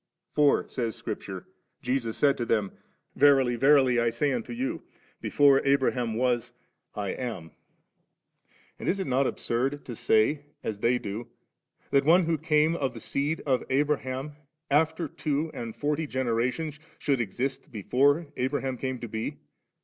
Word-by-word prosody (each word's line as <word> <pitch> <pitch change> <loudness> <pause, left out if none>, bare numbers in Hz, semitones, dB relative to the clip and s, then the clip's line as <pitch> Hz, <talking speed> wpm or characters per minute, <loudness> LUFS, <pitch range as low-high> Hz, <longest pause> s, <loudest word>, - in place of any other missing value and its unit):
For, 150 -1 +3
says 115 -4 -3
Scripture, - - -6 0.4
Jesus 125 -3 -1
said 140 -1 +4
to 120 - -2
them, 105 -3 +1 0.4
'Verily, 135 -3 +5
verily, 135 -1 +4
I 120 0 +2
say 145 +5 0
unto 230 -2 -3
you, 265 +6 -3 0.4
before 140 -2 +4
Abraham 130 -4 +1
was, 120 0 0 0.4
I 100 -2 -2
am 115 -9 -4
5/ - - -29 1.3
And - - -2
is 195 - 0
it 190 - -1
not 130 -1 +2
absurd 135 +5 -2
to 120 - -6
say, 125 +8 +2 0.2
as 105 -2 -3
they 120 +3 +3
do, 110 +1 -5 0.6
that 140 0 +4
one 170 +4 +5
who 160 -2 0
came 155 0 +2
of 135 -6 -2
the - - -7
seed 145 +7 -2
of 130 -3 +1
Abraham 135 0 0 0.4
after 160 +3 +2
two 150 +2 -2
and 115 -2 -6
forty 150 +1 -1
generations 130 +4 -1
^, - - -29 0.2
should 135 -4 0
exist 135 +6 -3
before 140 - +2
Abraham 130 0 -1
came 130 -1 -2
to 120 - -4
be 110 +1 -4
135 Hz, 155 wpm, -27 LUFS, 120-150 Hz, 1.3 s, Verily